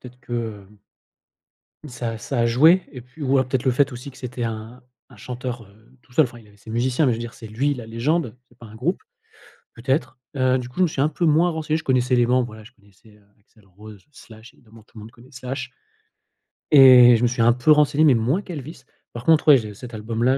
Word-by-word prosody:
peut-être 125 0 -14
que, 115 -5 -6
hem 105 - -22 1.1
ça 120 -3 -5
ça 120 +3 -4
a 115 - +2
joué 160 +10 +4
et 130 - -9
puis 130 +6 -16
ou 135 +1 +2
alors 130 -1 +1
peut-être 130 -1 -2
le 130 - +2
fait 135 +2 +1
aussi 125 +3 -9
que - - -18
c'était 125 -1 -6
un 115 +2 -7 0.3
un - - -16
chanteur, 125 -1 -7
heu, 110 +5 -23
tout 125 - -24
seul, 155 +3 +4
enfin, 120 -1 -11
il 110 -2 -17
avait 105 - -22
ses 110 - -16
musiciens 125 +5 0
mais 125 - +2
je 115 - -4
veux - - -6
dire, 120 0 -7
c'est 110 - -11
lui 135 +7 -1
la 120 -4 -9
légende, 125 +2 -2
c'est - - -27
pas 115 - -12
un 105 - -14
groupe, 135 +11 -2 0.7
peut-être, 130 +2 -3 0.2
heu, 130 -1 +1
du 125 - -8
coup, 125 - -21
je - - +1
me - - +3
suis 145 - -3
un 150 - +2
peu 170 - -2
moins 165 +3 +3
renseigné. 155 -1 -2
Je 160 - -8
connaissais 130 -1 0
les 120 -1 +2
membres, 125 0 +2
voilà, 110 -2 -12
je 115 - -16
connaissais, 105 0 -24
heu, 105 - -27 0.2
Axel 105 0 -28
Rose, 100 +1 -15
Slash, 115 -3 -16
évidemment, 115 -2 -20
tout 115 - -22
le - - -8
monde 110 +2 -11
connaît 125 +3 -19
Slash. 130 0 -6 1.0
Et 125 -4 +8
je 120 - -3
me - - +4
suis 120 -1 -2
un 115 +1 +5
peu 130 +5 +2
renseigné 150 0 +3
mais 150 -4 +6
moins 125 - 0
qu'Elvis. 160 -5 -9 0.3
Par 120 0 -8
contre, 160 -1 +3
ouais, 140 - +8
j'ai 105 -3 -6
cet 120 +3 -11
album-là, 115 +4 -1
125 Hz, 245 wpm, -22 LUFS, 115-135 Hz, 1.1 s, Et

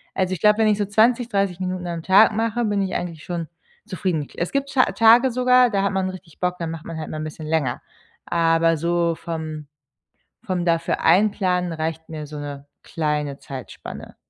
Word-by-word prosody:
Also 185 -1 0
ich 180 - -5
glaube, 210 0 +5
wenn 220 - +4
ich 210 -1 +3
so 205 - 0
20, 230 +4 +2
30 195 -4 0
Minuten 185 -1 -3
am 170 -1 -4
Tag 195 +5 +6
mache, 230 +2 0
bin 205 -1 0
ich 190 -1 -2
eigentlich 170 -3 -4
schon 170 -2 -4 0.4
zufrieden. 180 -7 -2
Es 175 - -2
gibt 275 0 -1
Ta 255 - +5
Tage 235 +3 +6
sogar, 250 0 +4
da 200 -2 +1
hat 200 - 0
man 190 -1 0
richtig 180 -4 -11
Bock, 180 0 0
da 170 - -3
macht 165 0 -7
man 165 - -6
halt 155 - -6
mal 155 - -5
'n - - -4
bisschen 155 0 -7
länger. 155 -5 0 0.4
Aber 165 -1 +2
so 170 +1 0
vom 155 -2 -6 0.8
vom 180 -2 -1
dafür 170 -1 0
einplanen 180 -1 +2
reicht 160 0 -4
mir 155 -2 -6
so 150 0 -8
'ne 145 -1 -7 0.2
kleine 150 -3 -2
Zeitspanne. 130 -3 -9
175 Hz, 195 wpm, -22 LUFS, 160-205 Hz, 0.8 s, Tag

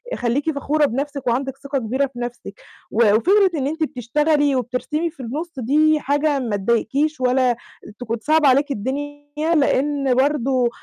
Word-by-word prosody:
خلّيكِ 265 +6 0
فخورة 295 +1 +1
بنفْسِك 280 +1 -3
وعندِك 265 +3 -1
ثقة 280 -1 -3
كبيرة 255 +5 0
في 250 -2 -12
نفْسِك، 240 -4 -7 0.3
وفكرة 240 - +4
إن 275 -2 -1
أنتِ 315 +2 -2
بتشتغلي 290 +3 +1
وبترسمي 260 +7 -2
في 305 -3 -21
النُص 310 +9 -5
دي 300 +5 +3
حاجة 290 0 0
ما 230 -5 -2
تضايقكيش 255 +8 0
ولا 250 -1 +2 0.4
تكون 235 -1 -3
صعبة 310 -1 +3
عليكِ 280 +3 +3
الدنيا 290 +5 -4 0.3
لإن 280 -2 +1
برضو 260 -3 +1
275 Hz, 145 wpm, -21 LUFS, 245-295 Hz, 0.4 s, وفكرة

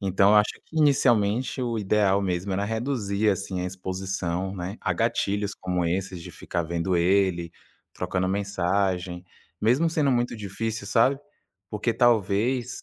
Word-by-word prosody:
então, 100 +1 +4
acho 105 0 +4
que 160 - -13
inicialmente 125 -4 +2
o 120 -2 -1
ideal 100 -1 +2
mesmo 95 +1 -2
era 100 +2 0
reduzir 110 -2 0
assim 95 -1 -3
a - - -2
exposição, 95 0 -3
né, 95 +2 -5
a - - 0
gatilhos 100 0 -1
como 90 -1 -2
esses 90 0 -2
de - - -9
ficar 85 - -3
vendo 85 +3 -1
ele, 90 -1 +2 0.4
trocando 95 0 -1
mensagem, 95 -2 -1 0.4
mesmo 130 +10 +3
sendo 155 -4 +1
muito 120 -1 0
difícil, 105 +1 -4
sabe, 130 +6 +3 0.5
porque 110 +2 -1
talvez, 120 +2 +1
100 Hz, 140 wpm, -25 LUFS, 95-115 Hz, 0.5 s, então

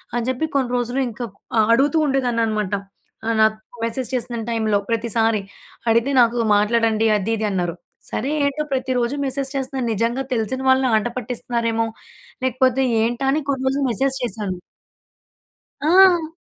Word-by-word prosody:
అని 240 0 -1
చెప్పి 260 +5 -1
కొన్ని 255 -3 +1
రోజులు 245 +2 -1
ఇంకా 240 +2 -5 0.3
ఆహ్, 215 - +4
అడుగుతూ 280 +5 +2
ఉండేదాన్ని 250 -4 +1
అనమాట. 210 -3 -2 0.5
ఆహ్, 230 0 +1
నాకు 220 0 +4 0.3
మెసేజ్ 230 +1 -3
చేసిన 240 -1 -3
టైంలో, 220 -3 +1
ప్రతిసారి 225 -1 +1 0.5
అడిగితే 235 +5 +2
నాకు 235 +1 +3 0.2
మాట్లాడండి 225 +1 +2
అది, 210 +3 -1
ఇది 215 - -1
అన్నారు. 175 -3 -1 0.4
సరే, 260 - -2 0.2
ఏంటో 280 +2 -1
ప్రతిరోజు 255 0 0
మెసేజ్ 270 0 -2
చేస్తున్నారూ 265 -2 -2
నిజంగా 230 +5 0
తెలిసిన 245 +3 -1
వాళ్ళ 260 0 +4
ఆటపట్టిస్తున్నారేమో? 235 0 -2 0.6
లేకపోతే 260 +1 +2 0.2
ఏంటా? 240 +3 -1
అని 305 - +1
కొన్ని 265 -1 -1
రోజులు 275 +1 +1
మెసేజ్ 265 +4 0
చేశాను. 205 -6 -3 1.3
ఆ! 355 -2 +6
240 Hz, 140 wpm, -21 LUFS, 225-265 Hz, 1.3 s, ఆ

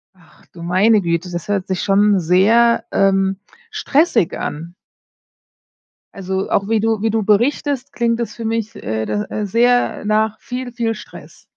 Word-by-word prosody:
Ach, 175 -3 -24
du 170 - -10
meine 200 +5 +3
Güte, 170 +1 -2
das 175 -2 -5
hört 200 -2 -1
sich 185 -1 -2
schon 200 0 +3
sehr, 210 +8 +3
ähm, 195 -1 +2 0.3
stressig 330 - +1
an. 165 +4 -6 1.4
Also, 190 0 -4
auch 200 0 0
wie 225 -1 +1
du 220 -1 0
wie 225 - +1
du 220 -1 0
berichtest, 255 +5 0
klingt 235 -1 0
es 230 -2 -4
für 230 - -7
mich 225 -1 -2
äh, 110 +1 -3
do 210 0 -2
äh, 210 - -3
sehr 245 +4 +1
nach 215 0 0
viel, 250 0 -6
viel 230 -2 -2
Stress. - - -13
210 Hz, 160 wpm, -18 LUFS, 190-230 Hz, 1.4 s, meine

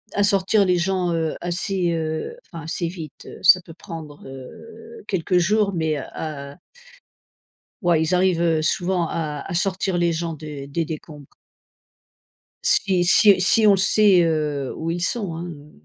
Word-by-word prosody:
à 205 - +1
sortir 200 +1 +3
les 180 -2 +2
gens, 180 0 0
heu, 165 -2 -1
assez, 175 +1 0
heu, 160 - -3
enfin 165 -3 -10
assez 165 +1 -2
vite, 165 -4 -9
heu. - - -11
Ça 185 0 +6
peut 170 -2 -13
prendre, 155 -3 -10
heu, 410 - -12
quelques 185 -1 0
jours 205 +3 +1
mais, 160 -3 -1
heu, 140 - -5
à 140 -3 -6 1.3
ouais 170 -3 +3
ils 160 +3 +1
arrivent, 180 -2 +2
heu, 165 -2 +2
souvent 175 +1 0
à 150 -3 -4
à 190 - -6
sortir 190 +1 -1
les 170 0 +2
gens 165 0 -3
des 150 -2 -8
des 165 +4 -2
décombres. 155 -2 -9 1.4
Si 185 -3 +2
si 200 +2 +6
si 215 +4 +4
on - - +7
le 195 - +3
sait, 195 -1 +4
heu, 150 -4 -1
où 160 - -4
ils 175 +1 -3
sont 195 -3 -2
hein, 170 +2 -6
heu, 150 -3 -11
170 Hz, 170 wpm, -22 LUFS, 155-190 Hz, 1.4 s, on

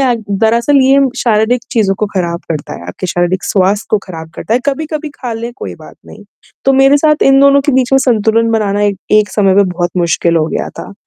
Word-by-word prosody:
अ, 255 -3 +2 0.2
दरअसल 235 +7 +1
ये 270 +1 +4 0.2
शारीरिक 230 +1 +1
चीज़ों 210 -5 +1
को 215 - 0
ख़राब 170 -2 -2
करता 150 -3 -4
है, 85 - -10
आपके 90 - -6
शारीरिक 175 +1 -1
स्वास्थ्य 200 +2 0
को 215 - +2
ख़राब 160 -3 -9
करता 220 - -3
है, 245 - +1
कभी-कभी 305 +2 -3
खा 245 -2 -6
लें 230 +1 -6
कोई - - -7
बात - - -15
नहीं। - - -13 0.4
तो 270 - +3
मेरे 270 +1 +4
साथ 305 +1 +2
इन 270 0 +5
दोनों 280 0 +5
के 290 - +2
बीच 255 0 +1
में 270 - +5
संतुलन 230 -3 +1
बनाना 205 -2 0
एक 205 -1 0 0.2
एक 210 -1 +4
समय 195 -3 +2
में 200 +1 +4
बहुत 175 0 -2
मुश्किल 170 -1 +1
हो 155 -1 +1
गया - - -3
था। - - -8
220 Hz, 220 wpm, -13 LUFS, 185-265 Hz, 0.4 s, इन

